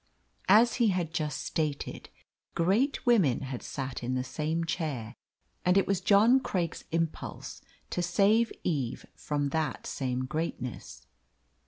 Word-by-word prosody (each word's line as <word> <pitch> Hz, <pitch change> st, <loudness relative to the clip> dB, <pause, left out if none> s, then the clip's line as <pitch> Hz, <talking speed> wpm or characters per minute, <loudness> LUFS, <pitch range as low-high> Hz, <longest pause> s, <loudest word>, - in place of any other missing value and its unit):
As 225 Hz, +4 st, +6 dB
he 235 Hz, -3 st, +4 dB
had 180 Hz, -5 st, 0 dB
just 150 Hz, -4 st, -2 dB
stated, 150 Hz, -3 st, -3 dB, 0.5 s
great 210 Hz, -, +1 dB
women 200 Hz, -, +4 dB
had 130 Hz, -2 st, -5 dB
sat 135 Hz, -1 st, -5 dB
in 125 Hz, +1 st, -2 dB
the 130 Hz, -, 0 dB
same 160 Hz, +5 st, -2 dB
chair, 145 Hz, -10 st, -3 dB, 0.5 s
and 180 Hz, +1 st, +4 dB
it 195 Hz, -, +4 dB
was 195 Hz, -2 st, 0 dB
John 215 Hz, +7 st, +5 dB
Craik's 180 Hz, -9 st, -3 dB
impulse 165 Hz, -1 st, -3 dB, 0.3 s
to 180 Hz, -, -1 dB
save 205 Hz, +6 st, +3 dB
Eve 140 Hz, -8 st, -2 dB
from 145 Hz, -1 st, -2 dB
that 155 Hz, -2 st, -2 dB
same 130 Hz, -1 st, -2 dB
greatness. 125 Hz, -, -5 dB
160 Hz, 135 wpm, -29 LUFS, 135-195 Hz, 0.5 s, As